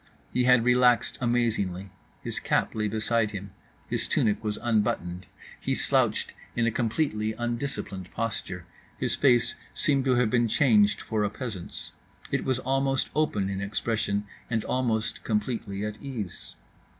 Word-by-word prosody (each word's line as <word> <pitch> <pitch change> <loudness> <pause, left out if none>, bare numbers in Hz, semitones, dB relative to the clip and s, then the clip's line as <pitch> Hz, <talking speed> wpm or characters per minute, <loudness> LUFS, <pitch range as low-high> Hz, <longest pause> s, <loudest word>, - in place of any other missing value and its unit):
He 125 - +2
had 125 -2 +6
relaxed 125 -1 +4
amazingly: 105 -6 0 0.3
his - - -3
cap - - +1
lay 105 -1 0
beside 110 +1 +1
him, 100 -1 -7 0.4
his - - -1
tunic 105 0 +1
was 105 -1 -1
unbuttoned, 95 -6 0 0.3
he - - -1
slouched - - +1 0.2
in 120 - +2
a 115 - +2
completely 110 -2 0
undisciplined 120 -6 -4
posture—his 95 -6 -3
face 125 -4 +4 0.2
seemed 135 -3 +2
to 130 -2 +4
have 120 -3 +2
been 120 -1 +3
changed 105 -5 +4
for 110 -1 -1
a 105 - +1
peasant's, 105 -5 -4 0.4
it - - +1
was 130 -2 +1
almost 135 +1 0
open 125 -11 +1
in 100 0 -3
expression 105 0 -1 0.2
and 115 -2 0
almost 115 -4 0
completely 105 -2 -1
at 105 0 -5
ease. 120 -10 -6
110 Hz, 140 wpm, -27 LUFS, 105-125 Hz, 0.4 s, had